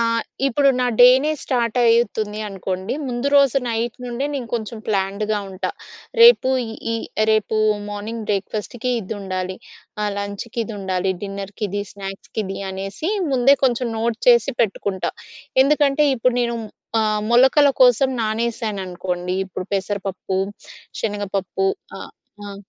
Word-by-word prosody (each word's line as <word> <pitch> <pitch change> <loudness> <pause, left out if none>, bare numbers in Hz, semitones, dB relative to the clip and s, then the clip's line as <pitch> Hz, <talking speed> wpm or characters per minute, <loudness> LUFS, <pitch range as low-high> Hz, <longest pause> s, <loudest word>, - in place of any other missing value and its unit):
ఆ! - - +3 0.4
ఇప్పుడు 275 +2 +3
నా 250 - +2
డేనే 260 +4 +7
స్టార్ట్ 235 -2 -1
అయితుంది 220 -2 +2
అనుకోండి. 190 +1 -4
ముందు 245 +2 -1
రోజు 275 -2 +5
నైట్ 230 +1 -2
నుండే 245 +3 -2
నేను 255 -4 -4
కొంచెం 225 0 -4
ప్లాన్డ్‌గా 205 +1 0
ఉంటా. 185 0 -3 0.5
రేపు 470 - +8 0.4
ఈ, - - 0 0.4
రేపు 215 0 +1 0.3
మార్నింగ్ 215 +2 -5
బ్రేక్‌ఫాస్ట్‌కి 215 +4 -2
ఇదుండాలి. 185 -2 -4 0.5
ఆహ్, 210 -1 0
లంచ్‌కి 200 +3 -5
ఇదుండాలి. 190 -3 -2
డిన్నర్‌కి 200 +1 -5
ఇది, 205 +2 -2
స్నాక్స్‌కి 195 +2 -6
ఇది 195 0 -5
అనేసి 195 - -4 0.2
ముందే 260 +2 +5
కొంచెం 245 -1 +1
నోట్ 230 0 -1
చేసి 240 +2 +5
పెట్టుకుంటా. 200 -3 -1 0.5
ఎందుకంటే 290 +1 +3
ఇప్పుడు 250 0 +1
నేను 235 -1 0 0.4
ఆహ్, 215 -1 +1
మొలకల 265 +4 +6
కోసం 250 +1 +5
నానేశాననుకోండి 195 -5 -2
ఇప్పుడు 185 0 -6
పెసరపప్పు, 195 -1 -2 0.6
శనగపప్పు 205 - -2 0.3
ఆహ్, - - -9 0.4
ఆ! 200 - -7
215 Hz, 120 wpm, -21 LUFS, 195-245 Hz, 0.6 s, రేపు